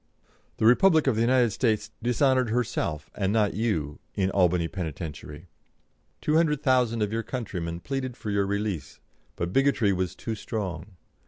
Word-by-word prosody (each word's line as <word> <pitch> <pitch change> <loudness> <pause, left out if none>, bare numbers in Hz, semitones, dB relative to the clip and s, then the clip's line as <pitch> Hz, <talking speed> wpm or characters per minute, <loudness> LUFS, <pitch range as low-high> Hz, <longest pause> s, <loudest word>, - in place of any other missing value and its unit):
The - - +1
Republic 160 - +5
of 135 - +3
the 110 - +1
United 120 -1 +3
States 110 -1 0
dishonoured 125 +1 +2
herself, 105 -10 -2
and 95 -1 -1
not 105 -2 +2
you, 95 -10 -1 0.2
in 95 -1 +1
Albany 90 -3 +2
penitentiary. 80 -2 -6 0.7
Two 155 +1 +2
hundred 150 -3 +2
thousand 125 -5 +2
of 105 +1 -2
your 115 - 0
countrymen 90 -9 -4
pleaded 130 -3 -4
for 105 - -4
your 100 -1 +1
release, 100 -8 -3 0.4
but 85 +1 -3
bigotry 135 -7 +3
was 90 -2 -2
too 115 - -4
strong. 100 -4 -5
105 Hz, 155 wpm, -26 LUFS, 90-125 Hz, 0.7 s, Republic